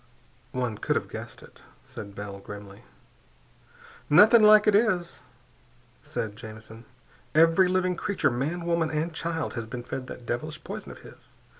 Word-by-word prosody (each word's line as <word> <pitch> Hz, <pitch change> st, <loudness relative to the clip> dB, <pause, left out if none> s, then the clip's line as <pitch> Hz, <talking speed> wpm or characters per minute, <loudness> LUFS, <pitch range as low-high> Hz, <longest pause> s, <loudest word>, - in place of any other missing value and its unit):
"One 125 Hz, -4 st, -3 dB
could -, -, 0 dB
have -, -, -2 dB
guessed -, -, -8 dB
it," -, -, -17 dB, 0.2 s
said 100 Hz, -1 st, -9 dB
Bell 100 Hz, -1 st, -7 dB
grimly. 100 Hz, 0 st, -11 dB, 1.2 s
"Nothing 220 Hz, +9 st, +7 dB
like 215 Hz, 0 st, +7 dB
it 210 Hz, -, +4 dB
is," 195 Hz, -5 st, +1 dB, 0.8 s
said 105 Hz, -2 st, -5 dB
Jamison. 110 Hz, +1 st, -11 dB, 0.5 s
"Every 165 Hz, +4 st, +5 dB
living 185 Hz, 0 st, +1 dB
creature, 195 Hz, -4 st, 0 dB
man, 155 Hz, +8 st, -2 dB
woman, 170 Hz, -1 st, +1 dB
and 160 Hz, +2 st, -2 dB
child, 160 Hz, 0 st, -3 dB
has 115 Hz, -2 st, -5 dB
been 120 Hz, +1 st, -6 dB
fed 130 Hz, +1 st, -6 dB
that 125 Hz, -, -9 dB
devilish 155 Hz, +6 st, -4 dB
poison -, -, -7 dB
of -, -, -12 dB
his. -, -, -16 dB
155 Hz, 150 wpm, -27 LUFS, 110-175 Hz, 1.2 s, Nothing